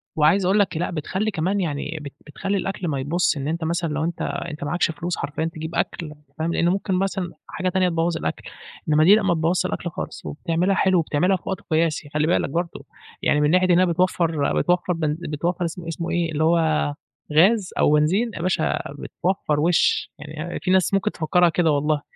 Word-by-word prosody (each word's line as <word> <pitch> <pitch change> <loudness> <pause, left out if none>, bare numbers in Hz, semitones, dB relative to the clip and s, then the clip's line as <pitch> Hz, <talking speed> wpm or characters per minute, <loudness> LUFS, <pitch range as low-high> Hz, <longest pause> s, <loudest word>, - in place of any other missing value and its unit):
وعايز 160 +5 +3
أقول 195 +3 +3
لك 190 -4 +1
لأ، 175 - -1
بتخلّي 190 +7 -2
كمان 190 +2 0
يعني 155 -2 -3
بت 140 -1 -8
بتخلّي 195 +6 -2
الأكل 190 -2 -3
ما 140 -3 -1
يبوظش، 155 +3 +1
إن 140 - -3
أنت 165 +2 -2
مثلًا 170 0 -1
لو 155 +2 -1
أنت 170 +1 -3
أنت 170 -4 -4
معاكش 165 +4 0
فلوس 175 +2 -4
حرفيًا 145 +3 -3
تجيب 160 0 -5
أكل، 170 - -1
أنت 150 -1 -17
فاهم، 165 +2 0
لأن 170 - +2
ممكن 195 +1 -1
مثلًا 190 -1 -1 0.2
حاجة 185 0 -2
تانية 185 0 +2
تبوّظ 165 0 0
الأكل، - - -4 0.5
إنّما 155 +1 +4
دي 195 +5 +8
لأ 215 - +1
ما 195 -3 +2
تبوّظش 170 +3 +1
الأكل 180 -1 -3
خالص، - - -7
وبتعملها 170 +5 0
حلو، 190 -2 +3
وبتعملها 170 +5 +1
في - - -26
وقت 190 -2 -3
قياسي 160 -2 0
خلّي 150 +1 +1
بالك 175 - +1
برضه، 170 +3 -3 0.4
يعني 150 - +3
من 150 - +3
ناحية 185 +1 +4
إنها 185 +2 +5
بتوفّر، 170 -3 +1
بتوفّر 180 0 +1
بن 155 -2 -1
بتوفر 170 +3 -2
اسمه 170 +1 -6
اسمه 165 0 -4
إيه، 170 -1 0
اللي 155 +1 0
هو 165 +2 +4 0.8
غاز 190 +5 +4
أو - - +4
بنزين 185 +11 +2
يا - - -5
باشا 185 +1 0 0.2
بتوفّر 175 -5 -1
وشّ، 170 +2 +2
يعني 155 +3 -6
في 185 - -1
ناس 190 +1 +3
ممكن 195 -1 +1
تفكّرها 175 +2 +2
كده 165 -1 +2
والله، 150 +1 +1
170 Hz, 205 wpm, -23 LUFS, 155-185 Hz, 0.8 s, دي